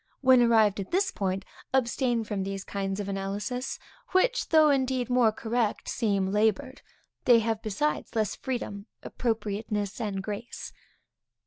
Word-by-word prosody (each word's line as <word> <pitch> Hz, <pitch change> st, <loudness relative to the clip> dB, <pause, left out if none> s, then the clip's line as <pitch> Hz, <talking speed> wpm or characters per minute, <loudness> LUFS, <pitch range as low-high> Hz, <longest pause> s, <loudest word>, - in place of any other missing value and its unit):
When 260 Hz, -2 st, +6 dB
arrived 220 Hz, -4 st, +4 dB
at 195 Hz, -, -5 dB
this 385 Hz, +2 st, +1 dB
point, 190 Hz, -1 st, -2 dB, 0.3 s
abstain 240 Hz, -2 st, +1 dB
from 210 Hz, -2 st, -3 dB
these 195 Hz, 0 st, -4 dB
kinds 195 Hz, 0 st, -3 dB
of 205 Hz, -, -3 dB
analysis, 200 Hz, +6 st, -3 dB, 0.4 s
which -, -, +2 dB
though 310 Hz, -2 st, +6 dB
indeed 260 Hz, -2 st, 0 dB
more 245 Hz, -3 st, +4 dB
correct, 225 Hz, 0 st, -1 dB
seem 200 Hz, -5 st, 0 dB
labored. 220 Hz, +6 st, +1 dB, 0.4 s
They 240 Hz, -2 st, +7 dB
have 225 Hz, -1 st, -1 dB
besides 225 Hz, +6 st, -2 dB
less 215 Hz, -2 st, 0 dB
freedom, 220 Hz, -5 st, -4 dB, 0.2 s
appropriateness, 210 Hz, -2 st, -2 dB
and 200 Hz, -3 st, -2 dB
grace. 215 Hz, +4 st, -6 dB
220 Hz, 135 wpm, -28 LUFS, 200-250 Hz, 0.4 s, They